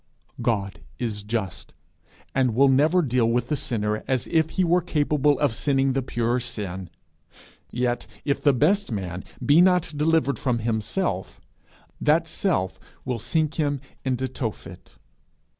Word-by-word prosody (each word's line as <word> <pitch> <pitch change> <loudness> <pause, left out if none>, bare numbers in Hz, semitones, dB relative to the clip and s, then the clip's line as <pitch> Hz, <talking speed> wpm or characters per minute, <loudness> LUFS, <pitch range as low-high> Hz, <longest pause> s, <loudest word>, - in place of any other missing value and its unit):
God 100 -5 -1 0.2
is 110 -4 -3
just, 105 -3 -4 0.6
and 130 -4 +1
will 135 +2 +5
never 155 +7 +4
deal 125 -4 +2
with 120 +1 0
the 150 - +1
sinner 105 -5 -2
as 130 -2 0
if 160 -1 +3
he 185 - 0
were 175 +1 +3
capable 150 -3 +2
of 145 -6 +1
sinning 135 +1 +1
the 135 - 0
pure 120 -1 0
sin; 100 -7 -5 0.8
yet 120 0 -1 0.2
if 140 - 0
the 145 - +5
best 160 +8 +2
man 95 -4 -4 0.2
be 150 +4 +6
not 180 -3 +3
delivered 150 -2 +2
from 125 -3 0
himself, 110 - -2 0.6
that 160 +2 +3
self 95 - -1 0.3
will 125 -2 -2
sink 155 +7 -1
him 145 -2 +1 0.2
into 130 0 -1
Tophet. 120 -4 -6
130 Hz, 140 wpm, -24 LUFS, 115-150 Hz, 0.8 s, be